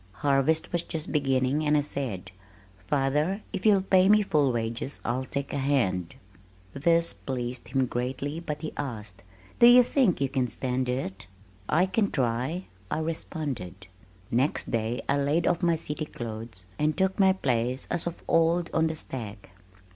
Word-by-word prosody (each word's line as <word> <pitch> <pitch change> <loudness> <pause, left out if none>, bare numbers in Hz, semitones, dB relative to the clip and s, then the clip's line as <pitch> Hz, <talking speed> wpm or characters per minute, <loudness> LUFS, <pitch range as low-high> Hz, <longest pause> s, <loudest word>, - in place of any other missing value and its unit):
Harvest 140 +3 +2
was 175 - +1
just 160 -2 -5
beginning, 135 0 +1
and 150 0 +3
I - - +3
said, 115 -11 -4 0.6
"Father, 150 +8 0
if 195 +2 0
you'll 200 -3 +5
pay 190 0 +4
me 210 0 +6
full 150 -8 +2
wages, 115 +3 -3
I'll 130 +2 -1
take 140 +1 -4
a 140 - -1
hand." 115 -11 0 0.6
This 170 +4 +2
pleased 125 -1 -5
him 135 -1 +1
greatly, 130 +5 -3
but 150 -2 -5
he 155 - -4
asked, 105 -9 -5 0.4
"Do 235 - +9
you 245 +1 +9
think 245 - +2
you 135 - +1
can 130 -2 0
stand 125 +1 -1
it?" 100 -6 -3 0.4
"I 170 +5 +4
can 200 +2 +1
try," 130 +7 -1 0.2
I - - -1
responded. 145 - -4 0.5
Next 130 +5 +1
day 115 +1 -1
I 140 +1 +2
laid 145 +4 +1
off 175 0 +1
my 170 -2 +3
city 155 -1 -4
clothes 115 -8 -7 0.2
and 150 +1 +1
took 190 +2 +1
my 190 -1 +6
place 125 -6 -1
as 175 -1 -1
of 170 - -6
old 165 +1 +2
on 160 0 +3
the 160 - -3
stack. 110 - -4
140 Hz, 165 wpm, -27 LUFS, 125-165 Hz, 0.6 s, Do